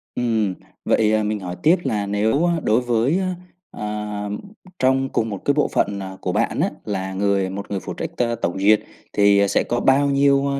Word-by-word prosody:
ừm, 110 -6 0 0.3
vậy, 110 -1 +3
à, 110 0 +2
mình 105 0 -1
hỏi 90 -2 -5
tiếp 160 +4 +6
là 105 -2 -1
nếu 110 +12 +1
đối 110 +4 +3
với, 125 +7 +1
a, 185 -1 -2 0.4
à, 105 -1 -4 0.5
trong 130 +1 +2
cùng 115 -3 -1
một 100 -3 -5
cái 140 - +3
bộ 150 - +2
phận, 100 0 0
à, 95 -1 -7
của - - -1
bạn - - 0
á, - - +2 0.2
là 95 -2 -3
người 100 -1 +1
một 100 +2 -7
người 100 - -1
phụ - - -6
trách - - -4
t - - +2 0.2
tổng 85 +3 -1
duyệt 105 +2 +5 0.3
thì 100 -1 +4
sẽ - - +2
có 120 - -1
bao 140 +2 +3
nhiêu, 140 0 +3
a, - - -2
105 Hz, 210 wpm, -21 LUFS, 100-130 Hz, 0.5 s, tiếp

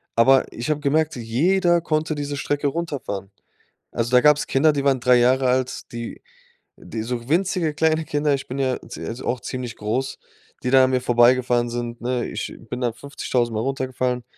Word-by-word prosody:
Aber 130 +3 +4
ich 120 +4 -5
habe 150 -1 +1
gemerkt, 155 +2 +1
jeder 170 +10 +2
konnte 155 -1 -1
diese 145 -1 -4
Strecke 145 +1 -1
runterfahren. 135 - -4 0.6
Also, 115 0 -1
da 125 0 +6
gab's 150 -1 +4
Kinder, 150 +3 +3
die 140 -1 -2
waren 135 -2 +2
3 125 0 +5
Jahre 130 +2 +3
alt, 130 0 -1
die 115 -1 -7 0.5
die 110 - -6
so 120 0 -4
winzige 170 0 +1
kleine 160 +1 +1
Kinder 145 -1 0
ich 135 - -5
bin 130 - -5
ja 130 -2 0
zie - - -7
also 120 +3 -6
auch 125 - 0
ziemlich 125 -2 -5
groß 120 +6 -2 0.5
die 125 - 0
da 135 -1 +7
an 130 - +1
mir 130 -1 +1
vorbeigefahren 120 0 +3
sind, 120 0 -4
ne? 125 0 -1
Ich - - -5 0.2
bin 125 - -4
dann 120 -2 +1
50.000 125 -3 -2
Mal 110 - -1
runtergefallen. 130 -1 -2
130 Hz, 190 wpm, -22 LUFS, 120-145 Hz, 0.6 s, da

